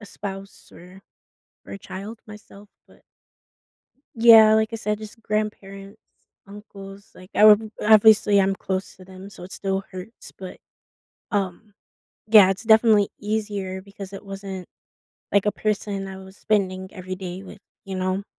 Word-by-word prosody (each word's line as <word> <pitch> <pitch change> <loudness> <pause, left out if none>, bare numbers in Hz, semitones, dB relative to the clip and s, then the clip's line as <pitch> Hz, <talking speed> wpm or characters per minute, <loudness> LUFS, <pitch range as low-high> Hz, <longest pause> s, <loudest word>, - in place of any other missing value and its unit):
a 205 - -12
spouse 195 -1 -9
or 180 +2 -15 0.6
or - - -11
a - - -8
child 200 +4 -9
myself, 210 -1 -14 0.2
but - - -22 1.2
Yeah, 225 -2 +8
like 220 0 +1
I - - -1
said, 210 -1 -2
just 215 +1 -11
grandparents, 210 -1 -5 0.5
uncles, 200 -1 -12
like, 185 0 -15
I 210 - +4
wa 210 -1 +10 0.3
obviously, 215 -1 +5
I'm 195 0 +1
close 190 0 -4
to 185 - -15
them, 190 +1 -12
so 185 - -13
it 185 - -11
still 195 0 -3
hurts, 185 +5 -11
but, 185 -1 -9 0.7
um, 200 +1 -3 0.6
yeah, 210 -3 +7
it's 195 +3 -4
definitely 220 -2 +5
easier 205 -3 -3
because 200 0 -11
it 195 +1 -9
wasn't, 195 -2 -8 0.7
like, 200 0 +2
a 210 - +2
person 205 -2 -3
I 190 - -8
was 190 +1 -14
spending 190 -3 -1
every 185 0 -7
day 185 0 -7
with, 200 +1 -12 0.3
you 190 -1 -6
know? 185 +2 -2
200 Hz, 155 wpm, -23 LUFS, 190-210 Hz, 1.2 s, wa